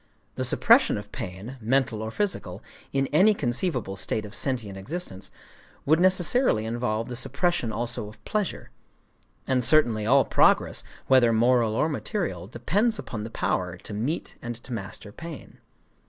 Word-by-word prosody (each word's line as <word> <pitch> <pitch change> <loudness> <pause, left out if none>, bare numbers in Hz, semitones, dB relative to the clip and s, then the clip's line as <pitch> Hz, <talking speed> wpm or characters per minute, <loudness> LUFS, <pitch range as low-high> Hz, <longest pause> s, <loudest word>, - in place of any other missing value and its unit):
The - - -3
suppression - - +4
of 105 0 -8
pain—mental 115 +5 -2
or 110 - -3
physical,—in 135 - -3
any 205 +7 +5
conceivable 125 - -1
state 105 +3 -2
of 105 - -10
sentient 120 -7 -1
existence, 95 - -6 0.6
would 155 +3 +4
necessarily 185 - +3
involve 115 -1 -2
the 125 - -5
suppression 140 0 0
also 115 -1 -3
of 105 0 -18
pleasure;—and 165 -9 -5
certainly 115 -7 +3
all 135 +3 +5
progress, - - +3 0.2
whether 125 -3 +5
moral 115 -1 +3
or 150 - +2
material, 155 - -3
depends 205 - 0
upon 110 - -6
the 110 - -6
power 90 -3 -2
to 105 - -10
meet 120 +11 -3
and 120 0 -5
to 120 +2 -9
master 105 -1 -7
pain. 165 +4 -10
120 Hz, 140 wpm, -26 LUFS, 110-150 Hz, 0.6 s, any